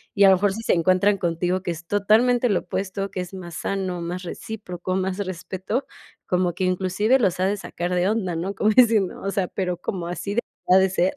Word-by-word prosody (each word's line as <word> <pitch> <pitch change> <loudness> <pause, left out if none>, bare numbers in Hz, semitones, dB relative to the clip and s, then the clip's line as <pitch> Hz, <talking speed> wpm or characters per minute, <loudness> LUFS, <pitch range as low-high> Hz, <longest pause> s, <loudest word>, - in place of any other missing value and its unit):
Y 200 - +6
a - - +8
lo 190 - +7
mejor 200 0 +1
si 225 - -5
se - - +2
encuentran 185 +4 +3
contigo 180 +1 -1
que 175 - -2
es 165 0 -8
totalmente 230 +5 +3
lo 195 - +2
opuesto, 195 +2 -3
que - - -5
es 180 +2 -8
más 175 -3 -8
sano, 185 -2 -2
más 175 +2 -4
recíproco, 185 -1 -5
más 190 0 -1
respeto, 190 +5 -3 0.4
como 180 -1 +1
que 185 +3 -2
inclusive 190 +6 +2
los 185 -6 +1
ha 185 - +2
de 205 +1 0
sacar 175 -2 -4
de 180 +2 +2
onda, 190 -6 -1
¿no?, 185 +4 -3
como 210 - +2
diciendo: 220 -5 +4
"O 195 - -1
sea, 195 -2 0
¿pero 180 -2 -2
cómo, 180 0 -4
así 200 +4 -4
debería 190 -5 +2
de - - -6
ser? 185 0 +1
190 Hz, 220 wpm, -23 LUFS, 180-200 Hz, 0.4 s, a